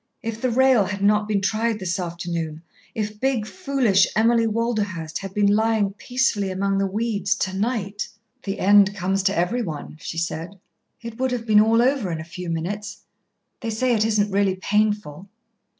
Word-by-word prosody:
If 225 0 -4
the 255 - +1
rail 255 -3 +4
had 200 +1 -4
not 210 +1 +3
been 205 -2 0
tried 220 +3 0
this 185 -1 -2
afternoon, 170 -2 -4 0.3
if 210 -1 -3
big, 260 -4 0
foolish 255 - +2
Emily 230 +1 +3
Walderhurst 210 -8 -2
had 195 -1 -7
been 205 -1 +3
lying 220 -2 +2
peacefully 225 -2 0
among 195 +1 0
the 195 - +1
weeds 210 0 -1
to 190 -3 -2
night! 205 -1 -2 0.3
"The 195 -1 -4
end 205 +1 +5
comes 190 +1 0
to 195 +1 0
everyone," 175 -5 -2
she 165 - -6
said. 170 +3 -4 0.5
"It 230 0 -8
would 260 0 +1
have 245 -2 -3
been 210 -2 +6
all 225 +2 +4
over 255 -8 +1
in 165 - -3
a - - -5
few 180 +1 -7
minutes. 200 +6 -4 0.6
They 230 - -4
say 245 +3 +1
it 215 -2 +2
isn't 210 -2 +1
really 195 -1 +2
painful." 205 -3 -1
205 Hz, 175 wpm, -23 LUFS, 190-225 Hz, 0.6 s, been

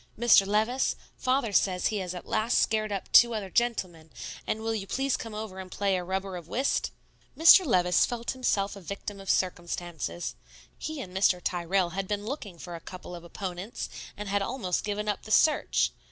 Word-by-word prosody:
"Mr. 220 -4 +6
Levice, 220 +6 +1 0.2
Father 255 -4 0
says 185 -2 +2
he 215 - -1
has 185 -2 -4
at 180 - -7
last 220 +2 +1
scared 215 -1 +1
up 195 -2 -4
two 235 -1 +7
other 195 -3 -4
gentlemen; 185 -9 -1 0.4
and 220 - -1
will 225 0 0
you 200 -3 -4
please 270 +3 0
come 225 -2 -6
over 210 -3 -6
and 185 -1 -8
play 200 -1 +1
a 180 - -2
rubber 190 +1 -3
of 170 -2 -10
whist?" 265 +9 0 0.5
Mr. 335 +4 +9
Levice 180 - +3
felt 235 -1 -2
himself 205 -6 0
a 200 - -10
victim 200 +2 -6
of 195 - -8
circumstances. 175 - -2 0.4
He 315 -2 -5
and 185 -6 -9
Mr. 190 -1 +3
Tyrrell 175 +1 0
had 190 +2 -3
been 205 0 -2
looking 215 - -5
for 175 +1 -8
a 170 - -6
couple 180 -1 -9
of 170 -1 -8
opponents, 185 +4 -6 0.3
and 210 0 -5
had 200 0 +1
almost 195 -5 -2
given 210 0 -3
up 210 - -1
the 215 - -10
search. 305 +7 +3
200 Hz, 195 wpm, -28 LUFS, 180-225 Hz, 0.5 s, Mr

